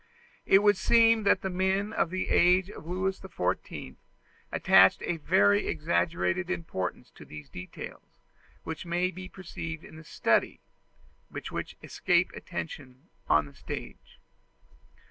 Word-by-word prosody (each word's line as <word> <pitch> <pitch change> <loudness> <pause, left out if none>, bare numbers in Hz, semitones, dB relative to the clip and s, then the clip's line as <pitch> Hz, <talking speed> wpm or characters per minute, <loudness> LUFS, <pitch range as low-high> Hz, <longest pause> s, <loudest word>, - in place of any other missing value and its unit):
It 195 +1 +6
would 205 -2 +5
seem 225 +2 +4
that 200 - +4
the 190 - -1
men 190 +3 0
of - - +1
the 185 +1 -3
age 180 +2 +4
of 160 - -11
Louis 185 +2 -2
XIV 90 - -4 0.5
attached 95 +1 +5 0.2
very 100 -6 +3
exaggerated 170 +3 0
importance 160 - -4
to - - -14
those 75 -2 -11
details, 90 +5 -10 0.5
which 160 -1 -5
may 175 +1 0
be 185 0 -9
perceived 165 -4 -7
in 155 - -12
the 160 - -11
study, - - +1 0.7
but - - -7
which - - -5
escape - - +1
attention 125 - -8 0.2
on 75 0 +4
the 70 - -13
stage. - - -8
170 Hz, 130 wpm, -28 LUFS, -, 0.7 s, It